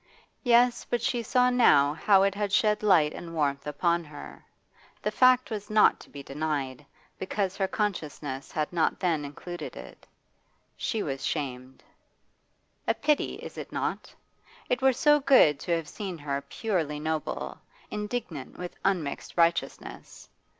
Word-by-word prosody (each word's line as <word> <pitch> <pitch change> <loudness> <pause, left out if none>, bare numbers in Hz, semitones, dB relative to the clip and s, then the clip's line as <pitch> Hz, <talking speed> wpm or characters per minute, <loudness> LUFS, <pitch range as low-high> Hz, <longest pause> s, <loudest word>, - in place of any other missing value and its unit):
Yes, 245 -1 +4
but 240 - +1
she 235 +1 -1
saw 250 +2 +3
now 145 - +5
how 195 +4 +4
it 195 0 +2
had 205 0 -2
shed 210 +1 +3
light 165 -8 +4
and 165 -1 -8
warmth 140 -2 -1
upon 170 +3 +1
her; 150 -1 -11 0.6
the - - 0
fact 255 -1 +4
was 210 -2 -5
not 215 0 +5
to - - -15
be 140 -1 -9
denied, 140 -2 -3 0.4
because 190 0 -2
her 195 -1 0
consciousness 150 -10 -3
had 155 +2 -2
not 165 -2 +1
then 165 -5 0
included 175 +5 -7
it - - -12 0.7
She 220 -4 -2
was 135 -2 -4
shamed. 130 -3 -4 1.0
A - - +2
pity, 300 0 +1
is - - -8
it - - -8
not? - - -3 0.6
It 250 - +1
were 265 0 +5
so 295 +4 +4
good 260 - +5
to 170 +2 0
have 165 -2 -4
seen 190 -2 -6
her 140 -2 -3
purely 165 -9 -2
noble, 155 0 -3 0.3
indignant 210 - -5
with 180 -1 -7
unmixed 175 -7 -2
righteousness. 170 0 -1
175 Hz, 150 wpm, -28 LUFS, 150-215 Hz, 1.0 s, now